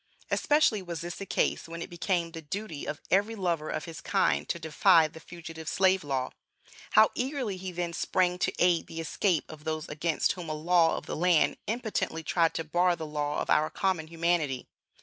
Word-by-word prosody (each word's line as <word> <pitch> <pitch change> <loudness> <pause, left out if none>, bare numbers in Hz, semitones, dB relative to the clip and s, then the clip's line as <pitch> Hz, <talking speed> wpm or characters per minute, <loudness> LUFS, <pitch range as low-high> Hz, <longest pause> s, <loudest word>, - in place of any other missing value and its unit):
Especially 290 -8 +3
was 170 -3 -5
this 175 +1 -5
the 195 - -7
case - - 0
when 170 0 -6
it - - -9
became 175 -1 -1
the 165 -1 -7
duty 160 0 -5
of 150 - -4
every 205 +4 +3
lover 170 -6 -1
of - - -3
his 165 -2 -8
kind 75 -1 +1
to - - 0
defy 160 +1 +4
the 160 +1 -12
Fugitive 165 -1 -8
Slave 190 -1 +3
Law. 135 -3 -2 0.6
How 215 0 +7
eagerly 255 -5 -2
he 185 0 -6
then 175 -1 -3
sprang 180 +1 +1
to - - +1
aid 175 -2 +3
the 165 - -7
escape 165 +1 0
of 155 -1 -11
those 155 -1 -3
against 155 +2 0
whom 175 -3 -6
a 155 - -2
law 165 +1 +3
of - - -7
the - - -4
land 175 -1 +3
impotently 220 -7 -2
tried 165 +1 +2
to 165 - -1
bar 175 +3 +2
the 160 -1 -6
law 150 -1 -2
of - - -3
our 155 - +4
common 180 -5 -1
humanity! 165 -5 0
170 Hz, 200 wpm, -29 LUFS, 155-185 Hz, 0.6 s, How